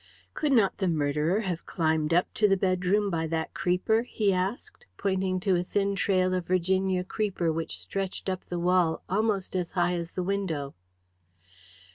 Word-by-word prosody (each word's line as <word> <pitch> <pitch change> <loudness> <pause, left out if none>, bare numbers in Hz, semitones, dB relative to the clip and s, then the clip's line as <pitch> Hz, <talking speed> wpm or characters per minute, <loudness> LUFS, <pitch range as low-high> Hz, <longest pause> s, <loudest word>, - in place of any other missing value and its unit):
"Could 300 -2 0
not 225 -7 +3
the 190 - +1
murderer 155 +4 +1
have 180 -5 -4
climbed 160 -2 0
up 175 +2 +2
to 210 - +3
the 195 -1 +3
bedroom 190 +2 +1
by 160 -1 -1
that 160 0 -2
creeper?" 180 +5 +1
he 215 -4 0
asked, 195 - -3
pointing 190 -1 0
to 190 0 +2
a 175 - +1
thin 200 +2 0
trail 185 -2 +2
of 180 -2 -2
Virginia 185 +1 +1
creeper 185 -4 -1
which 165 0 -4
stretched 195 -1 -4
up 185 -1 -2
the 175 - -4
wall 175 -2 +2
almost 200 -1 0
as 180 -2 -2
high 175 0 +2
as 170 -1 -4
the 185 - -2
window. 175 -8 -2
185 Hz, 170 wpm, -28 LUFS, 170-195 Hz, -, not